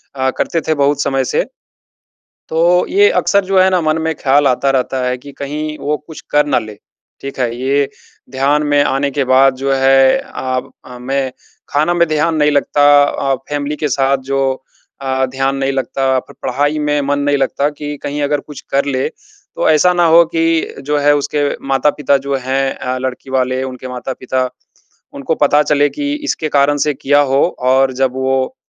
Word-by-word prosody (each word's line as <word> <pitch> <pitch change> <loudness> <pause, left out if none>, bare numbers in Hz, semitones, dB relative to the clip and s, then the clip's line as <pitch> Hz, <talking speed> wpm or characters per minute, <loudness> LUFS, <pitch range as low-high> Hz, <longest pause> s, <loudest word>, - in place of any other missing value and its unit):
अ, 130 -1 0
करते 165 - -1
थे, 160 - +3
बहुत 145 0 +1
समय 135 -1 0
से। - - 0 1.0
तो 170 +2 +3
ये 410 +2 +4
अक्सर 200 - +1
जो 190 0 +2
है 185 0 +5
ना, 185 -1 +2
मन 155 0 +1
में 160 0 -1
ख्याल 140 +1 +2
आता 135 +1 +1
रहता 130 0 -1
है 125 0 -1
कि 140 +2 -12
कहीं 150 +2 -4
वो 150 +1 -1
कुछ 160 - -10
कर 150 0 +3
ना 145 - +2
ले। 110 -2 -9 0.5
ठीक 140 -1 -7
है? 120 -2 -1
ये 140 +1 +1 0.4
ध्यान 140 +3 +1
में 145 0 +3
आने 140 +1 0
के 140 0 0
बाद 130 +1 +4
जो 135 +1 -1
है, 135 0 +4
आब 130 -1 -4
अ, 125 -1 -10
मैं 135 +1 -2 0.4
खाना 155 +4 +1
में 170 -1 +2
ध्यान 155 +1 +1
नहीं 150 -1 +2
लगता 145 0 +1 0.2
अ, 135 -1 0
फ़ैमिली 145 0 -2
के 150 - -1
साथ 135 +1 +1
जो 135 0 +1 0.6
अ, 130 -1 0
ध्यान 135 +1 -1
नहीं 135 0 0
लगता, 135 0 0
फिर - - -16
पढ़ाई 145 +4 0
में 150 0 0
मन 145 +1 -1
नहीं 145 0 +1
लगता 140 +1 0
कि 150 0 -6
कहीं 145 +1 -3
अगर 145 0 0
कुछ 150 -2 -11
कर 140 +1 +1
ले, 130 -2 -1
तो - - -5
ऐसा 160 +4 +4
ना 175 -1 +2
हो 165 +1 +7
कि 165 0 0
जो 150 +2 0
है, 145 0 +4
उसके 145 0 -1 0.2
माता-पिता 140 +1 +2
जो 140 - 0
हैं 135 +1 -1
अ, 130 0 -4
लड़की 130 +1 -5
वाले, 130 0 0
उनके 130 -1 -7
माता-पिता, 130 0 -3 0.6
उनको 140 +3 -2
पता 145 +1 +4
चले 145 0 +2
कि 285 - -3
इसके 155 - -2
कारण 145 0 +2
से 150 - +1
किया 145 +2 +2
हो 135 - +4 0.3
और 130 0 +3
जब 130 0 0
वो 130 - -1
140 Hz, 190 wpm, -16 LUFS, 130-150 Hz, 1.0 s, हो